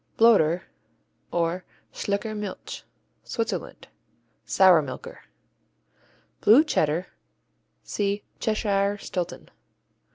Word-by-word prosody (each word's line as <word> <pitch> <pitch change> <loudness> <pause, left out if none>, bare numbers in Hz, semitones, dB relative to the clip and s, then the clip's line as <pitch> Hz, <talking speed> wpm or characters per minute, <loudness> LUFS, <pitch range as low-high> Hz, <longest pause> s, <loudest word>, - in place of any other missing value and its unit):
Bloder, 185 -7 +5 0.7
or 170 +2 0 0.3
Schlicker 205 +2 -2
Milch 210 -2 -6 0.4
Switzerland 230 -1 -4 0.6
Sour 185 -4 +6
milker. 130 -3 -8 1.2
Blue 240 +8 +7
Cheddar 165 - +1 0.8
see 205 0 -2 0.2
Cheshire 205 -2 +1
Stilton. 180 -3 -5
200 Hz, 70 wpm, -26 LUFS, 175-215 Hz, 1.2 s, Blue